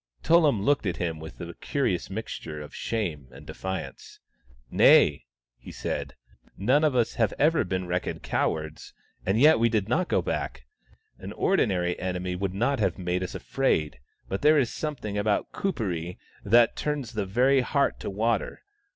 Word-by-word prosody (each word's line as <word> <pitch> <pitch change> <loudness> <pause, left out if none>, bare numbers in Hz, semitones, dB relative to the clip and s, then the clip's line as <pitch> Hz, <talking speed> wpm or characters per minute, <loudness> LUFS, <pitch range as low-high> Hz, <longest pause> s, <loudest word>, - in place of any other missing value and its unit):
Tullum 155 - +4
looked 140 -4 +2
at 90 - -2
him 80 -3 -3
with 80 0 -10
a 85 -1 -7
curious 130 - -2
mixture 95 -6 -6
of 75 -1 -10
shame 85 - -3
and 60 - -13
defiance. 95 0 -6 0.3
" - - -30
Nay," 75 - +6 0.3
he - - -11
said. - - -4 0.2
" - - -32
None 130 +10 +3
of 150 -4 +2
us 120 -2 +2
have 110 - +2
ever 155 +3 +3
been 95 -1 -3
reckoned 90 +1 -3
cowards 80 0 -2
— - - -33
and 100 +4 +2
yet 150 0 +6
we 115 +1 +3
did 110 -3 0
not 170 +10 +1
go - - +1
back. - - -3 0.6
An - - -7
ordinary 90 - +1
enemy 90 0 -3
would 95 0 -3
not 120 +6 +1
have 95 -5 0
made 90 -1 -2
us 90 - -5
afraid, 75 - -1 0.3
but 95 - -3
there 150 +1 +5
is 130 -5 +1
something 115 -10 -4
about 105 0 0
Kuperee 90 - -3 0.3
that 115 +3 +4
turns 145 -5 -3
the 105 -3 -2
very 130 +7 +3
heart 140 +2 0
to - - -5
water. 110 +2 -1
100 Hz, 175 wpm, -26 LUFS, 90-130 Hz, 0.6 s, Nay